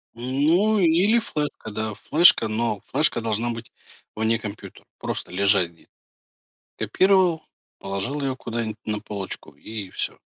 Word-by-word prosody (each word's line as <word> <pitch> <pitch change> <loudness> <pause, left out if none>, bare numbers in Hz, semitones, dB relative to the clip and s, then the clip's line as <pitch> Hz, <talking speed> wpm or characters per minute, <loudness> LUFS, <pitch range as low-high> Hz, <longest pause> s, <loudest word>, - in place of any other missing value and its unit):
Ну, 155 - +2
или 185 +7 +4
флешка, 150 - -4
да, 110 0 -3
флешка, 150 - +5
но 110 -1 -1
флешка 150 -6 +1
должна 115 +2 -1
быть 115 -1 -8 0.4
вне 110 +1 +1
компьютера, 105 -1 -9
просто - - -4
лежать 95 -2 +2
где 85 - -25 0.9
Копировал, 180 - +3 0.4
положил 100 +9 -3
её 135 -1 -1
куда-нибудь 115 -3 -4
на 105 -1 -2
полочку, 100 -2 -6
и 105 -4 -7
всё. - - -4
115 Hz, 130 wpm, -24 LUFS, 105-155 Hz, 0.9 s, флешка